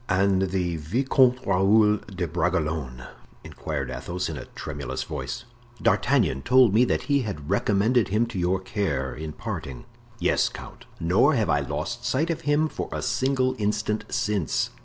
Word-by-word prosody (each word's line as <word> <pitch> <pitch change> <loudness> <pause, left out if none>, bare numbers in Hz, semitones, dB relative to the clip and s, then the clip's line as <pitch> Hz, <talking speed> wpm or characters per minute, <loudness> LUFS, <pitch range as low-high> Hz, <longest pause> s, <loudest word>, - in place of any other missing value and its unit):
"And 95 0 +2
the 90 -3 -1
Vicomte 125 - +2
Raoul 105 +3 +4
de 95 -4 -5
Bragelonne?" 75 -6 -2 0.4
inquired - - -5
Athos, 90 0 -4
in 80 - -4
a - - -7
tremulous - - -4
voice. 120 0 -5 0.4
"D'Artagnan 65 - +2
told 125 - +5
me 120 +4 +5
that - - 0
he 140 -1 +2
had 95 - -5
recommended 110 +3 +2
him 105 +4 +1
to 95 - -3
your 90 +2 +1
care, 75 -9 -2
in 75 +4 -6
parting." 70 -3 -6 0.3
"Yes, - - +2
count; - - -11
nor 95 - +3
have 110 -4 +1
I 75 - +3
lost 75 - -4
sight 155 +7 0
of 165 0 -3
him 150 +2 +3
for - - -5
a - - -3
single 130 -1 +1
instant 105 +1 -1
since." 105 -6 0
100 Hz, 160 wpm, -25 LUFS, 80-120 Hz, 0.4 s, told